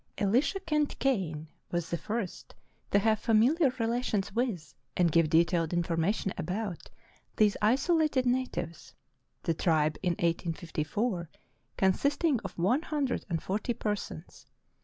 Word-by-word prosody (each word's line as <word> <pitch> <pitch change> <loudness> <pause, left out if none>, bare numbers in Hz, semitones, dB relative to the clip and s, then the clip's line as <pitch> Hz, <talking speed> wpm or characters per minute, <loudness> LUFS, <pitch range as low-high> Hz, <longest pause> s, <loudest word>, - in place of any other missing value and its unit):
Elisha 255 - +2
Kent 300 -5 0
Kane 175 - -1 0.2
was 175 -1 -2
the 170 - 0
first 215 -4 -5 0.3
to - - +3
have 215 +1 +2
familiar 255 +8 +4
rela 240 -1 -1
tions 200 -4 -1
with 210 - -2 0.2
and 175 -2 +3
give 165 -1 +3
detailed 165 0 +2
information 175 +3 0
about 190 -1 -4 0.5
these 210 -2 +4
isolated 275 +4 +2
natives, 245 -10 -2 0.5
the 165 - +1
tribe 155 -2 +1
in 180 -2 +1
1854 170 +3 -2 0.5
consisting 280 - +2
of - - -8
one 225 - +2
hundred 290 -6 -2
and 165 -3 -2
forty 210 +5 -2
persons. 205 -6 -5
205 Hz, 125 wpm, -30 LUFS, 170-250 Hz, 0.5 s, familiar